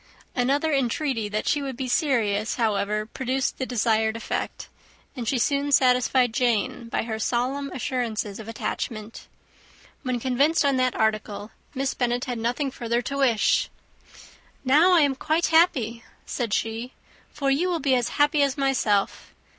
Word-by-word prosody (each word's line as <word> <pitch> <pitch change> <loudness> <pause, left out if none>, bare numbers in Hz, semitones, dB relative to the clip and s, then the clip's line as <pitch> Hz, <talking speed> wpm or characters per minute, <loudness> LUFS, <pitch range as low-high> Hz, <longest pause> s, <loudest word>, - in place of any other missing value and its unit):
Another 280 +5 +1
entreaty 260 -3 0
that 210 +1 -3
she 290 - +2
would 270 -3 -5
be 260 -1 -3
serious, 225 - +1
however, 210 -2 0
produced 260 +3 -2
the 260 - -2
desired 220 -2 +1
effect; 230 - -4 0.5
and 240 -4 -5
she 260 - +1
soon 280 +4 0
satisfied 250 -2 +3
Jane 240 0 0
by - - -1
her 220 -1 -4
solemn 260 +5 -1
assurances 230 -5 -3
of 220 - -9
attachment. 220 0 -5 0.7
When 255 -2 -2
convinced 275 +6 +2
on 275 -2 +2
that 255 -1 +1
article, 215 -1 -1 0.2
Miss 265 0 -1
Bennet 245 0 -1
had 245 -2 -4
nothing 245 +5 -1
further 240 -1 -2
to 275 - -4
wish. 245 -6 +2 1.0
"Now 310 +8 +5
I 335 - +6
am 285 -2 +3
quite 315 +5 0
happy," 245 -9 +3 0.2
said 235 -4 -3
she, 225 +4 -2 0.4
"for 275 -1 -1
you 335 +7 +1
will 345 -2 0
be 275 -2 +1
as 245 -2 +1
happy 290 0 +3
as 275 -1 +1
myself. 245 -8 0
250 Hz, 155 wpm, -25 LUFS, 225-275 Hz, 1.0 s, I